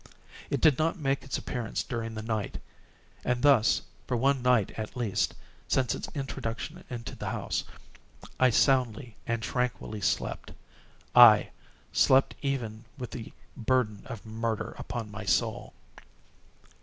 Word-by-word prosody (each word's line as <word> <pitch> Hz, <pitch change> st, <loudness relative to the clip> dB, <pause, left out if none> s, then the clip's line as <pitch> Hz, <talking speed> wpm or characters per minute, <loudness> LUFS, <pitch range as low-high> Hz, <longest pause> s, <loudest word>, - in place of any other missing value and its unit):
It 140 Hz, -, -1 dB
did 150 Hz, -5 st, +5 dB
not 165 Hz, +3 st, +1 dB
make 140 Hz, -3 st, 0 dB
its 135 Hz, -, -3 dB
appearance 120 Hz, -3 st, -3 dB
during 115 Hz, -1 st, -4 dB
the 110 Hz, -, -5 dB
night; 110 Hz, -3 st, -2 dB, 0.6 s
and 125 Hz, 0 st, 0 dB
thus 135 Hz, -7 st, +5 dB, 0.2 s
for 125 Hz, -, 0 dB
one 135 Hz, +2 st, +2 dB
night 125 Hz, -5 st, +3 dB
at 110 Hz, +2 st, -6 dB
least, 115 Hz, -6 st, 0 dB, 0.3 s
since 130 Hz, -3 st, +2 dB
its -, -, -5 dB
introduction 135 Hz, +4 st, -4 dB
into 120 Hz, -2 st, -6 dB
the -, -, -4 dB
house, -, -, -2 dB, 0.7 s
I 130 Hz, -, +6 dB
soundly 125 Hz, -2 st, +2 dB
and 115 Hz, -1 st, -1 dB
tranquilly 125 Hz, -4 st, -2 dB
slept; -, -, -1 dB, 0.6 s
aye, 120 Hz, -4 st, +9 dB, 0.4 s
slept 135 Hz, +1 st, +5 dB
even 120 Hz, -6 st, -3 dB
with 125 Hz, -5 st, -6 dB
the 115 Hz, -3 st, -7 dB, 0.2 s
burden 110 Hz, -4 st, +1 dB
of 115 Hz, -2 st, -8 dB
murder 110 Hz, 0 st, -2 dB
upon 115 Hz, -3 st, -5 dB
my 105 Hz, +1 st, -6 dB
soul! 95 Hz, -, 0 dB
120 Hz, 135 wpm, -29 LUFS, 110-130 Hz, 0.7 s, aye